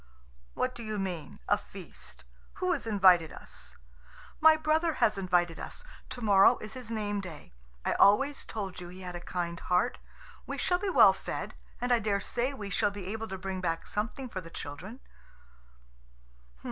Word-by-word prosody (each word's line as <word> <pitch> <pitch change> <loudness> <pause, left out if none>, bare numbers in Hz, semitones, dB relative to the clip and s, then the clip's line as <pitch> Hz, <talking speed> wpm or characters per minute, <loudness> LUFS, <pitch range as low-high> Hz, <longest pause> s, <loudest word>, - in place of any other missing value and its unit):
"What 255 - 0
do 240 - -9
you 215 -2 -3
mean? 180 -7 -4
A - - +3
feast? - - -12 0.3
Who 365 0 -1
has 280 -8 -3
invited 185 -6 +5
us?" - - -9 0.6
"My 315 0 +7
brother 315 +2 +2
has 215 -6 +2
invited 180 -3 +1
us. - - -7 0.3
To 255 -1 -6
morrow 200 -2 +6
is 215 0 -8
his 255 -3 -8
name 205 -2 -2
day. 160 - -10 0.3
I - - +2
always 270 +8 +4
told 195 -4 -5
you 175 - -7
he 185 +1 -10
had 180 -1 -6
a - - -4
kind 170 -1 -3
heart. 180 +7 +1 0.5
We - - -4
shall 355 0 +1
be 405 - -1
well - - +7
fed, - - -5 0.3
and 245 0 +1
I 240 - +4
dare 205 -2 0
say 245 +6 -1
we 210 -7 -7
shall 205 - +2
be 200 -1 -6
able 225 0 -4
to 190 - -5
bring 190 0 -4
back 165 -2 -1
something 220 +5 -2
for 190 -6 -5
the 165 - -11
children." 185 - -8
205 Hz, 180 wpm, -30 LUFS, 180-245 Hz, 0.6 s, My